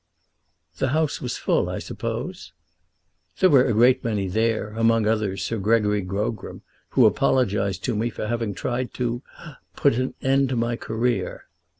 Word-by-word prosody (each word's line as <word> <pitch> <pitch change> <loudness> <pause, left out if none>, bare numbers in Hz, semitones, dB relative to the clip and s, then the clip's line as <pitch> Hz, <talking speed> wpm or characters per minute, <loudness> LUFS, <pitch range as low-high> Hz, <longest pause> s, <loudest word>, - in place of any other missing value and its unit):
"The 135 - +1
house 160 -2 0
was 125 -1 -3
full, - - +1
I - - -3
suppose?" - - -5 0.9
"There 185 - +5
were 135 -3 +6
a 120 - +1
great 125 +4 +4
many 105 -4 -1
there; 110 +2 0
among 115 0 +2
others 105 -4 0
Sir 115 +3 -2
Gregory 105 0 +2
Grogram, 100 +4 -4 0.3
who - - +4
apologised 100 -7 +1
to 120 - -1
me 115 +3 0
for 110 - -5
having 115 -2 -2
tried 125 0 -3
to 120 -1 -2 0.5
put - - +3
an 130 - -2
end 135 0 +3
to 130 - -1
my 120 0 0
career." 115 +2 -2
115 Hz, 160 wpm, -24 LUFS, 105-125 Hz, 0.9 s, were